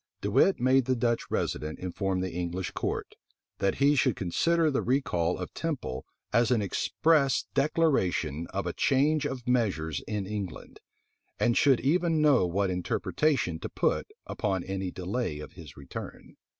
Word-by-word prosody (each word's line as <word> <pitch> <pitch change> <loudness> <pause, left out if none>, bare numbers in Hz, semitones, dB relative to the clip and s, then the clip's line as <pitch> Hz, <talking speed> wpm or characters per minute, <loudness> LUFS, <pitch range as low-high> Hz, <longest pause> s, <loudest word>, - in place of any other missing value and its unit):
De - - -2
Wit 195 - +4
made 130 +1 +3
the 130 0 +1
Dutch 120 -1 0
resident 75 +1 -2
inform 95 +1 -2
the 95 -1 -3
English 90 +1 -3
court, - - -3 0.5
that 100 -1 +1
he 140 +2 +4
should 130 - +2
consider 160 - +1
the 135 - 0
recall 90 -10 0
of 90 - -6
Temple 130 - -4 0.3
as 115 0 +4
an 125 - +3
express 140 - +2
declaration 95 - +1
of 100 0 -4
a 90 - -2
change 145 +2 +2
of 130 -4 -6
measures 90 - 0
in 105 -3 -2
England; 100 -3 -6 0.6
and 120 - +2
should 135 -4 +4
even 165 +3 +2
know 140 -11 +4
what 95 +2 0
interpretation 90 - 0
to - - -5
put - - 0 0.2
upon 95 -4 -2
any 95 0 -3
delay 90 -1 -3
of 75 - -8
his 80 -6 -12
return. 70 -1 -9
105 Hz, 155 wpm, -28 LUFS, 90-135 Hz, 0.6 s, Wit